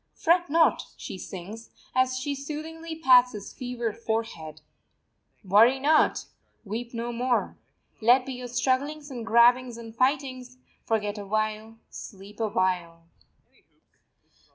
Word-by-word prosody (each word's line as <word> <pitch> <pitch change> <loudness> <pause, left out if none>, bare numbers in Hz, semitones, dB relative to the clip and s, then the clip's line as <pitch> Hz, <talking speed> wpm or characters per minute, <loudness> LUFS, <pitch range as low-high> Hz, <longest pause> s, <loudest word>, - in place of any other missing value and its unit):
"Fret 345 +1 +2
not," 325 +2 +3
she - - -7
sings, 200 +6 -9 0.3
as 255 0 +2
she 280 +2 -2
soothingly 315 +3 -6
pats 250 -6 +5
its 200 -1 -8
fevered 240 -3 -4
forehead. 220 -10 -4 0.8
"Worry 220 +7 +5
not; 305 +3 +3 0.4
weep 230 +4 -5
no 235 0 -4
more. 245 +1 0 0.5
Let 245 +3 +5
be 265 - -5
your 250 0 -7
strugglings 280 +4 -1
and 240 -3 -6
grabbings 235 +2 +4
and 225 -1 -10
fightings; 255 -1 -1 0.3
forget 210 -2 -1
a 200 - -7
while, 215 +1 -2
sleep 200 0 -11
a 225 - +1
while." 180 -5 -1
240 Hz, 125 wpm, -26 LUFS, 215-260 Hz, 0.8 s, pats